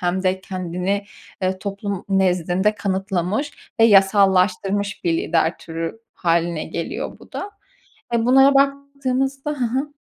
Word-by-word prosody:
hem 180 Hz, +1 st, 0 dB
de 185 Hz, 0 st, +1 dB
kendini, 185 Hz, +2 st, -3 dB, 0.4 s
eee, 185 Hz, 0 st, 0 dB
toplum 200 Hz, 0 st, -4 dB
nezdinde 190 Hz, +1 st, +2 dB
kanıtlamış 195 Hz, -, -2 dB
ve -, -, +8 dB
yasallaştırmış 195 Hz, 0 st, +3 dB
bir 170 Hz, -, +2 dB
lider 165 Hz, 0 st, +1 dB
türü 165 Hz, +5 st, -5 dB, 0.2 s
hâline 170 Hz, -2 st, 0 dB
geliyor 165 Hz, +1 st, -5 dB
bu -, -, -18 dB
da. 410 Hz, -, -5 dB, 0.6 s
E 230 Hz, -1 st, +2 dB
bunlara 270 Hz, +2 st, +6 dB
baktığımızda 275 Hz, 0 st, 0 dB
ha 250 Hz, -4 st, -2 dB
ha. 290 Hz, +2 st, -2 dB
195 Hz, 125 wpm, -21 LUFS, 180-245 Hz, 0.6 s, ve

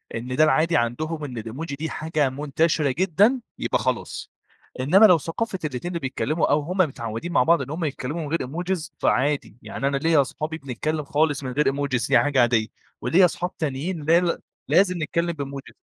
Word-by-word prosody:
إن 125 Hz, +2 st, -4 dB
ده 155 Hz, -, +5 dB
العادي 155 Hz, 0 st, +3 dB
عندهم 150 Hz, +7 st, -2 dB
إن 130 Hz, -4 st, -6 dB
الإيموجي 130 Hz, +8 st, -5 dB
دي 160 Hz, +3 st, -4 dB
حاجة 155 Hz, -3 st, 0 dB
منتشرة 150 Hz, +2 st, 0 dB
جدًا، 195 Hz, -, +2 dB, 0.2 s
يبقى -, -, 0 dB
خلاص. -, -, -3 dB, 0.5 s
إنّما 185 Hz, +12 st, +6 dB
لو 180 Hz, -4 st, +7 dB
ثقافة 185 Hz, +6 st, -4 dB
الاتنين 145 Hz, +3 st, -4 dB
اللي 170 Hz, -, -3 dB
بيتكلّموا 145 Hz, +3 st, -1 dB
أو 145 Hz, -, +4 dB
هم 170 Hz, +6 st, -5 dB
متعوّدين 130 Hz, -, -1 dB
مع 125 Hz, -, +4 dB
بعض 165 Hz, +2 st, +3 dB
إن 135 Hz, -, -6 dB
هم 160 Hz, +3 st, -3 dB
يتكلّموا 145 Hz, +3 st, -4 dB
من 155 Hz, -, -4 dB
غير 165 Hz, +2 st, 0 dB
إيموجيز، 170 Hz, +5 st, -3 dB
فعادي. 140 Hz, -4 st, 0 dB
يعني 135 Hz, -, -3 dB
أنا 140 Hz, 0 st, 0 dB
ليّا 160 Hz, +1 st, +3 dB
أصحابي 155 Hz, +4 st, -4 dB
بنتكلّم 150 Hz, +2 st, -3 dB
خالص 145 Hz, 0 st, +1 dB
من 130 Hz, -, -4 dB
غير 150 Hz, +4 st, +1 dB
إيموجيز 135 Hz, -3 st, 0 dB
دي -, -, +5 dB
حاجة 145 Hz, -3 st, +2 dB
عادية 115 Hz, -2 st, +2 dB, 0.3 s
وليّا 175 Hz, +9 st, +5 dB
أصحاب 180 Hz, +1 st, -3 dB
تانيين 155 Hz, +3 st, -3 dB
لا 165 Hz, +3 st, +5 dB
ل 175 Hz, -1 st, -1 dB, 0.3 s
لازم 185 Hz, -2 st, +3 dB
نتكلّم 170 Hz, +2 st, -1 dB
بإيموجيز. 140 Hz, -3 st, -7 dB
150 Hz, 190 wpm, -24 LUFS, 135-170 Hz, 0.5 s, لو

